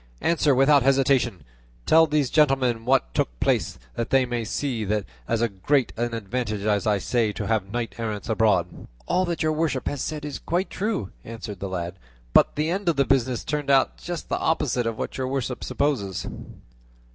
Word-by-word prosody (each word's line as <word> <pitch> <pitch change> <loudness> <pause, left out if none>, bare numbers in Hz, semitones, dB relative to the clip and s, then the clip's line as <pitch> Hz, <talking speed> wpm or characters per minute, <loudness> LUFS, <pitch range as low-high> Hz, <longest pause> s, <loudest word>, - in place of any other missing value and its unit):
Answer 155 -4 +3
without 135 +2 +5
hesitation; 130 -6 +2 0.4
tell 160 0 +6
these 150 -4 +1
gentlemen 135 -6 +2
what 135 +2 +2
took - - -1
place, - - +1 0.2
that 115 - -3
they 135 -1 +4
may 120 -1 -2
see 120 0 -2
that 105 +1 0
it - - -16 0.3
is 115 0 +2
as 120 - +2
great 140 +1 +2
an 120 0 -2
advantage 110 -1 -3
as 105 0 +1
I 105 -1 +3
say 110 +2 0
to 100 - -4
have 105 -2 -1
knights 120 0 -4
errant 110 -3 -3
abroad." 105 -6 +1 0.2
"All 185 - +1
that 170 -3 -2
your 155 - +2
worship 155 -5 -1
has 140 - -2
said 150 -1 -4
is 145 -2 -5
quite 180 +3 -1
true," 205 - -2
answered 110 -3 -7
the 100 - -4
lad; 90 0 -4 0.3
"but - - +5
the 155 +2 0
end 190 0 0
of 165 - +2
the 140 - +3
business 130 -2 +1
turned 145 -2 -3
out 135 -1 +3
just 175 -2 -6
the - - -1
opposite 125 -7 0
of 115 -1 -3
what - - -4
your 130 - -1
worship 130 -2 -3
supposes." 110 -11 -1
125 Hz, 195 wpm, -25 LUFS, 110-145 Hz, 0.4 s, tell